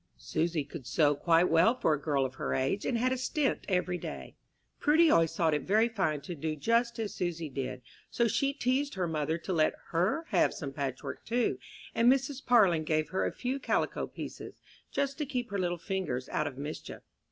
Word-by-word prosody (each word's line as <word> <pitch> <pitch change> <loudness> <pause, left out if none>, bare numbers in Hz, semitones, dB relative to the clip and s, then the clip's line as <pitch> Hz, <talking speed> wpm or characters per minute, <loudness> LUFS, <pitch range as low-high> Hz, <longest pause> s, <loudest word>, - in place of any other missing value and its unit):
Susy 155 - -1
could 140 -2 -9
sew 150 -3 +3
quite 165 +4 +3
well 170 +9 +4
for 160 -10 +2
a 150 - -2
girl 140 -3 +1
of 130 - -4
her - - -2
age, 135 +10 0
and 245 - +1
had 255 +2 +1
a 260 - 0
stint 270 +2 0
every 180 -1 0
day. - - -7 0.4
Prudy 315 +2 +5
always 165 -1 +3
thought 165 -3 +2
it 150 - +1
very 215 +7 +3
fine 185 -10 -1
to 160 +5 -6
do 155 0 -3
just 235 +8 +1
as 220 -3 -3
Susy 170 -3 -3
did, 130 -2 -5 0.3
so 235 - +1
she 275 +5 +1
teased 275 0 0
her 185 -2 -1
mother 160 0 -1
to 185 +3 -4
let 155 -2 +2
her 185 - +1
have - - +2
some 140 -4 -5
patchwork, 135 -3 -4
too, 240 +1 0 0.3
and 235 +2 +5
Mrs. 270 0 -1
Parlin 195 -10 +4
gave 155 -1 0
her 185 - 0
a - - -2
few 260 +2 -3
calico - - 0
pieces, - - -8 0.3
just 280 +1 -1
to 300 - 0
keep 245 -5 -3
her 200 - -1
little 175 -1 0
fingers 165 -8 -3
out - - 0
of 130 - -7
mischief. 145 +2 -7
175 Hz, 205 wpm, -30 LUFS, 155-240 Hz, 0.4 s, Prudy